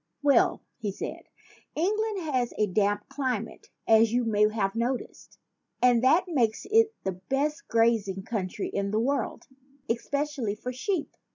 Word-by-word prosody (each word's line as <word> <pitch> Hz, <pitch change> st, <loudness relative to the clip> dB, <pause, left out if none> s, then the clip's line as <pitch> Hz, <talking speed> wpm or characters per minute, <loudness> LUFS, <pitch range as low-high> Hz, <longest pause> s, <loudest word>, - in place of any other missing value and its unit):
"Well," 280 Hz, -4 st, +3 dB, 0.2 s
he 210 Hz, -4 st, -2 dB
said, -, -, -6 dB, 0.5 s
"England 415 Hz, +4 st, 0 dB
has 255 Hz, -6 st, -1 dB
a 210 Hz, -, +3 dB
damp 205 Hz, +1 st, 0 dB
cli 260 Hz, -4 st, -1 dB
mate, 225 Hz, +2 st, -10 dB, 0.2 s
as 220 Hz, 0 st, +5 dB
you 245 Hz, +1 st, +2 dB
may 210 Hz, -2 st, +3 dB
have 195 Hz, -3 st, -1 dB
noticed; 240 Hz, +3 st, -4 dB, 0.4 s
and 245 Hz, -1 st, +4 dB
that 320 Hz, +8 st, +5 dB
makes 240 Hz, -10 st, 0 dB
it 450 Hz, 0 st, +4 dB
the 190 Hz, -, -1 dB, 0.2 s
best 300 Hz, +4 st, -1 dB
grazing 225 Hz, -4 st, +2 dB
country 200 Hz, -3 st, -3 dB
in 200 Hz, 0 st, -2 dB
the 215 Hz, +2 st, 0 dB
world 275 Hz, +5 st, -1 dB, 0.4 s
es 230 Hz, -1 st, -2 dB
pecially 280 Hz, -7 st, -1 dB
for 250 Hz, +3 st, -5 dB
sheep. 320 Hz, +6 st, -2 dB
235 Hz, 155 wpm, -27 LUFS, 215-290 Hz, 0.5 s, as